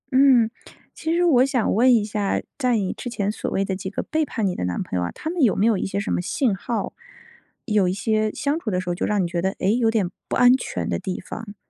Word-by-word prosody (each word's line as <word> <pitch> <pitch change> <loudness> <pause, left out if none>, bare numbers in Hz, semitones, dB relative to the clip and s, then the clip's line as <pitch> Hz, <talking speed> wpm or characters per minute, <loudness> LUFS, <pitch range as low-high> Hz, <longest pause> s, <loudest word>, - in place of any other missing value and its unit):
嗯， 255 -4 +5 0.4
其 320 - -3
实 350 - +2
我 260 -7 +5
想 260 -4 +1
问 245 +5 +5
一 210 -2 +1
下， 205 -2 -1 0.2
在 250 -4 +2
你 195 -3 -1
之 245 - -6
前 210 -3 -1
所 - - -4
谓 195 - 0
的 190 - -2
几 190 0 -5
个 200 - -4
背 315 0 0
叛 230 -7 -2
你 185 -2 0
的 - - -3
男 90 -1 -2
朋 - - -6
友 - - 0
啊， 85 - -3
他 315 - -5
们 350 - -2
有 235 -7 +4
没 205 - +2
有 230 -1 +4
一 190 - -2
些 195 +1 -2
什 200 - -3
么 - - 0
信 215 - 0
号？ 215 +1 -3 0.7
有 210 -5 +2
一 180 - 0
些 215 +1 0
相 290 +3 -1
处 240 - -4
的 180 -3 0
时 185 - -4
候 175 - +1
就 175 - -2
让 205 -3 +1
你 - - -1
觉 170 0 -2
得， 190 +2 0
诶， 200 +3 +1
有 235 -2 +2
点 205 -6 0 0.2
不 - - -2
安 250 +1 +6
全 - - -4
的 - - -1
地 185 -2 -4
方。 210 +2 -8
215 Hz, 300 characters per minute, -23 LUFS, 190-250 Hz, 0.7 s, 安